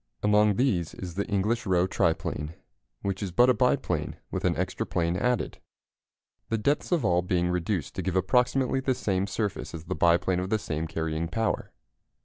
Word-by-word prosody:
Among 105 0 +4
these 95 - 0
is 90 -2 -6
the 100 +3 -2
English 105 +3 0
Roe 90 -1 +3
triplane, 80 -3 -1 0.5
which 100 0 -2
is 100 -3 -3
but 125 +8 +5
a - - +3
biplane 125 0 0 0.2
with - - -2
an - - +2
extra - - -1
plane 85 0 -1
added; 125 +5 0 0.9
the 115 - +1
depths 140 +11 0
of 165 -9 +2
all 90 -2 +3
being 90 -1 0
reduced 90 -1 -1
to - - -3
give 95 -1 -2
approximately 125 +6 +2
the 130 -1 0
same 95 -3 0
surface 100 -3 -3
as 80 - -7
the 85 - -3
biplane 85 +1 +3
of 90 +1 -3
the 110 - +2
same 80 -5 -3
carrying 80 0 -2
power. 110 +5 -1
95 Hz, 180 wpm, -27 LUFS, 85-115 Hz, 0.9 s, but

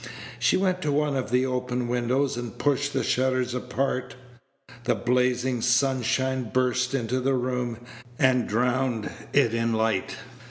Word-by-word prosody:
She - - +3
went 185 -1 0
to 150 - 0
one 145 0 +1
of 130 -4 -2
the 125 +2 +2
open 125 -1 -2
windows, 125 +3 0
and 120 -2 -6
pushed 145 0 +1
the 135 - -1
shutters 130 -1 +1
apart. 125 +1 -2 0.7
The - - +2
blazing 125 0 +1
sunshine 130 0 +1
burst 125 +1 +1
into 125 0 -1
the 135 +1 +1
room, 125 -2 -2 0.4
and 130 -2 +3
drowned 120 0 0 0.2
it 125 -6 +3
in 115 0 0
light. 110 -3 0
125 Hz, 145 wpm, -26 LUFS, 120-130 Hz, 0.7 s, She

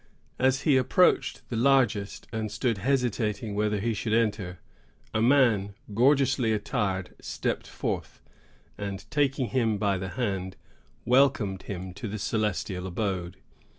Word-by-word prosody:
As 130 +1 +3
he 145 -5 +4
approached 130 +8 +2
the 120 - -3
largest, 120 -5 +2
and 110 -1 -2
stood 115 -1 -1
hesitating 115 -4 0
whether 105 0 0
he 115 +3 0
should 110 +1 -2
enter, 105 -6 0 0.6
a 110 - +1
man 115 -6 +3 0.2
gorgeously 130 -1 +3
attired 105 -4 -2
stepped - - -3
forth, - - -4 0.6
and, 100 -2 -5
taking 135 -4 +1
him 115 -5 +1
by 100 -2 +1
the 95 0 -4
hand, 95 -5 -3 0.5
welcomed 125 -7 +3
him 95 -2 -5
to 100 +4 -6
the 105 +1 -4
celestial 100 -3 -2
abode. 95 -2 -3
110 Hz, 130 wpm, -27 LUFS, 100-130 Hz, 0.6 s, he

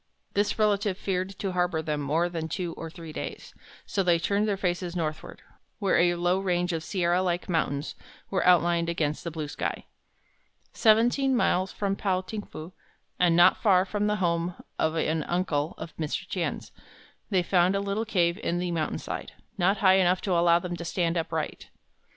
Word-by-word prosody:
This 205 +1 +1
relative 205 -3 +1
feared 190 0 -3
to 195 - -2
harbor 180 -2 0
them 150 -2 -2
more 155 +5 +1
than 165 -2 -4
two 175 -2 -3
or 165 - -7
three 165 -2 -10
days, - - -7 0.3
so 195 - -1
they 175 -2 +3
turned 200 +5 0
their 200 -2 0
faces 180 -2 -2
northward, 155 -3 -4 0.3
where 200 -3 +2
a 175 0 +3
low 175 +2 +1
range 180 -2 0
of 160 -1 -3
sierra 175 +1 +1
like 175 -1 -1
mountains 150 -4 -1 0.4
was 190 - +1
outlined 170 -1 +4
against 155 -3 -1
the 170 - -3
blue 155 -2 -5
sky. - - -4 0.9
Seventeen 240 +4 +3
miles 185 -5 +1
from 195 -1 -1
Pao 190 -2 0
ting 210 +3 -5
fu, 165 -2 -10 0.5
and 175 -2 +4
not 175 - +5
far 190 -4 +4
from 205 +1 -1
the 210 - +1
home 170 -2 0 0.2
of 160 0 +1
an 160 0 0
uncle 165 -3 -1
of 160 - -8
Mr. 155 -2 -3
Tien's, - - -3 0.6
they 185 -4 +2
found 180 +1 +3
a - - +1
little 200 +2 -1
cave 180 -4 +1
in 175 - -1
the 180 0 -2
mountainside, 160 -2 -3 0.3
not 190 +3 +3
high 190 0 +7
enough 180 -1 +3
to 195 - -2
allow 170 -1 +5
them 175 0 -4
to 170 - -6
stand 170 0 -1
upright. 160 -2 -3
175 Hz, 180 wpm, -27 LUFS, 170-195 Hz, 0.9 s, high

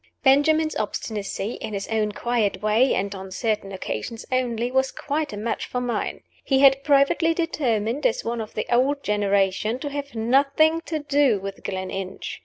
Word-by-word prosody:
Benjamin's 310 +3 +4
obstinacy 210 0 -3
in 215 - -4
its 195 - -4
own 215 -1 0
quiet 210 -4 -1
way, 220 +5 +3
and 200 +1 -2
on 190 -1 -8
certain 210 0 -2
occasions 190 - -5
only 245 -2 0
was 265 0 +1
quite 295 0 -3
a - - -6
match 225 +3 -3
for 250 - -2
mine. 245 -1 -2 0.2
He 270 - +2
had 275 0 +5
privately 290 +4 +3
determined, 260 -6 0
as 225 - -3
one 235 0 -2
of 215 - -8
the 215 - -2
old 275 +4 +2
generation, 200 +1 +1
to 290 +1 -5
have 280 -2 -5
nothing 280 +8 +3
to 320 - -1
do 285 -6 +2
with 195 0 -7
Gleninch. 190 0 -5
235 Hz, 170 wpm, -24 LUFS, 210-280 Hz, 0.2 s, had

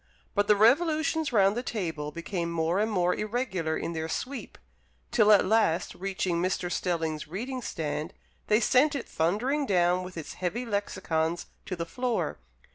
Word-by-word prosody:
But 205 -1 +2
the 210 - +6
revolutions 315 +7 +3
round 200 -3 +4
the 240 - -1
table 165 -11 -3
became 170 +1 -3
more 165 +2 +1
and 220 +1 +1
more 180 -3 +2
irregular 210 -8 -2
in 170 - -3
their 160 0 -3
sweep, 260 +9 -5 0.5
till 215 -3 +5
at 205 - +6
last 185 -5 +2
reaching 185 -2 -1
Mr. 180 -1 -1
Stelling's 165 -3 -1
reading 250 - -4
stand, 155 -3 -3 0.4
they 215 +1 +4
sent 270 +6 +4
it 270 - -4
thundering 245 - 0
down 180 -1 +3
with 180 -1 -8
its 160 - -6
heavy 200 +8 -3
lexicons 175 -6 -1 0.2
to 185 - -2
the 170 -1 -3
floor. 245 +7 -2
190 Hz, 160 wpm, -28 LUFS, 170-235 Hz, 0.5 s, the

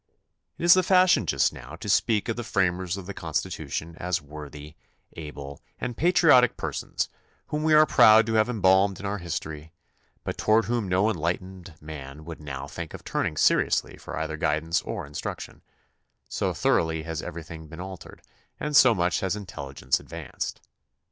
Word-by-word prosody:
It - - -7
is 175 0 +8
the 185 - +5
fashion 185 - +4
just - - +2
now - - -10
to - - -9
speak 110 -2 +2
of 115 - -1
the 120 - -4
framers 95 -3 0
of 95 - -7
the 100 - -6
Constitution 85 -3 -4
as 90 0 0
worthy, 75 0 -10 0.4
able, 70 -3 -8 0.2
and 125 -1 -4
pa 160 - -2
triotic 150 -9 +5
persons - - -3 0.4
whom 150 - -2
we 155 0 +4
are 155 0 +8
proud 110 -5 +7
to 115 - -2
have 110 +1 +3
embalmed 95 -3 +3
in 100 - -7
our 100 +1 -2
history, 80 -2 -6 0.5
but - - -5
toward 110 0 +3
whom 115 -1 -1
no 95 +3 +3
enlightened 90 0 -4
man 75 -1 -9
would 80 -1 -8
now 70 -2 -6
think 80 +2 -7
of - - -11
turning 75 - -2
seriously - - +2
for - - -8
either - - -3
guid 75 +1 0
ance 80 0 0
or - - -5
instruction, 70 0 -7 0.7
so - - -1
thoroughly 80 -1 +1
has 80 -2 -4
everything 80 -1 -8
been 80 +3 -11
altered 95 -1 -9 0.4
and 150 0 -2
so 130 -4 +7
much 90 -1 +1
has 95 +1 -1
intelligence 70 -9 -3
advanced. - - -6
90 Hz, 175 wpm, -26 LUFS, 80-110 Hz, 0.7 s, is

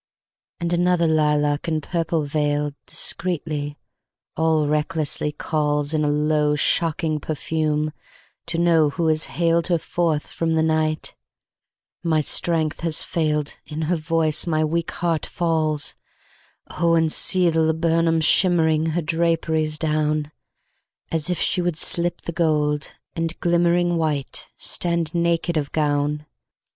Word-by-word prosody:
And 170 0 -1
another 175 0 +2
lilac 150 -2 +1
in 160 -1 0
purple 165 0 -1
veiledDiscreetly, 145 +1 -2 0.6
all 160 -1 +2
recklessly 150 0 -1
callsIn 150 0 -1
a - - +1
low, 150 0 +2
shocking 155 +1 0
perfume, 155 0 -1 0.5
to 165 - -3
know 165 -3 +4
who 165 +3 -2
has 155 0 +2
hailedHer 170 0 +1
forth 160 -3 -1
from 165 -1 -1
the 160 0 +2
night: 155 -1 0 0.9
my 160 -2 +1
strength 160 +1 +1
has 165 -2 +1
failedIn 150 -1 -2
her 170 +3 +1
voice, 165 0 0
my 155 -1 +1
weak 165 +2 -1
heart 170 -3 -1
falls:Oh, 165 +1 -2
and 160 -1 +2
see 185 -2 +2
the 160 0 +1
laburnum 165 +1 +2
shimmeringHer 160 -1 +3
draperies 160 -2 0
down, 155 -1 0 0.8
As 160 0 0
if 180 - 0
she 180 - +1
would 175 -3 -1
slip 170 +1 0
the - - -5
gold, 150 -3 0 0.2
and 165 -1 -2
glimmeringWhite, 170 -4 +1
stand 170 -2 -1
naked 170 0 0
of 145 -2 -2
gown. 150 0 0
160 Hz, 115 wpm, -22 LUFS, 150-170 Hz, 0.9 s, know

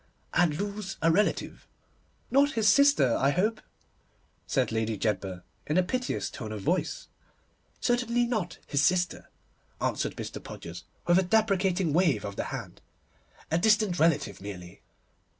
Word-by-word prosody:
'And 160 -4 +2
lose 200 0 -4
a 165 - +5
relative.' 205 +6 0 0.6
'Not 280 +2 +4
his 225 -2 +1
sister, 250 - +5
I 135 - +3
hope?' 210 +9 0 0.9
said - - +1
Lady 110 -1 -1
Jedburgh, 95 -4 -2 0.2
in 150 - +1
a 185 - +5
piteous 250 +7 -2
tone 110 -3 -7
of 105 -2 -5
voice. - - -1 0.7
'Certainly 240 0 +1
not 215 -8 -2
his 140 -1 0
sister,' 180 +4 +1 0.5
answered - - -1
Mr. - - -7
Podgers, - - -9 0.2
with 175 +1 +5
a - - +4
deprecating 190 -4 +1
wave 155 - +2
of 100 -1 -5
the - - -3
hand, - - -7 0.7
'a 165 - +2
distant 210 -2 +3
relative 145 - +1
merely. 90 -3 -9
175 Hz, 140 wpm, -28 LUFS, 130-215 Hz, 0.9 s, a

